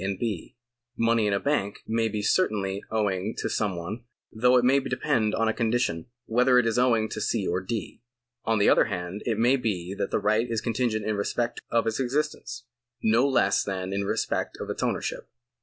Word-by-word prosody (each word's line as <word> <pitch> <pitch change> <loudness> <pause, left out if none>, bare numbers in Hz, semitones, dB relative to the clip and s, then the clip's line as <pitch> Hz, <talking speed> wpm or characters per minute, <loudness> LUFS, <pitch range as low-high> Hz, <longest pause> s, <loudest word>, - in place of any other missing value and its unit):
and 95 -1 -2
B. 105 -7 -4 0.4
Money 115 -2 +2
in 100 - +1
a 100 - +1
bank 105 -8 -1
may 115 0 +1
be 105 -1 -3
certainly 100 - +1
owing 105 -1 -1
to - - -2
some 105 -4 -1
one, 100 +8 -6 0.3
though 125 +3 +4
it 125 - +3
may 135 +2 +5
depend 130 -5 0
on 115 - +1
a 110 - +2
condition, 110 -8 0 0.2
whether 125 +2 +3
it 125 - +4
is 115 +1 +1
owing 115 -3 +3
to 110 - -5
C. 105 -1 0
or 90 +2 0
D. 110 +4 -5 0.4
On 115 0 +1
the 100 - +3
other - - +5
hand, 90 +3 -4
it 115 -3 +1
may 120 +4 +4
be 95 -7 -2
that 100 - -3
the - - +1
right 110 +3 +1
is 115 -1 0
con 115 - -2
tingent 110 -2 0
in 110 -1 -1
respect 120 +4 -2
of 115 -1 +2
its 110 -1 -1
existence, 130 -2 -2 0.4
no 115 +5 +4
less 135 - +2
than 95 -1 -3
in 100 0 -1
respect 100 - -2
of - - -4
its - - -5
ownership. - - -2
110 Hz, 205 wpm, -26 LUFS, 100-120 Hz, 0.4 s, may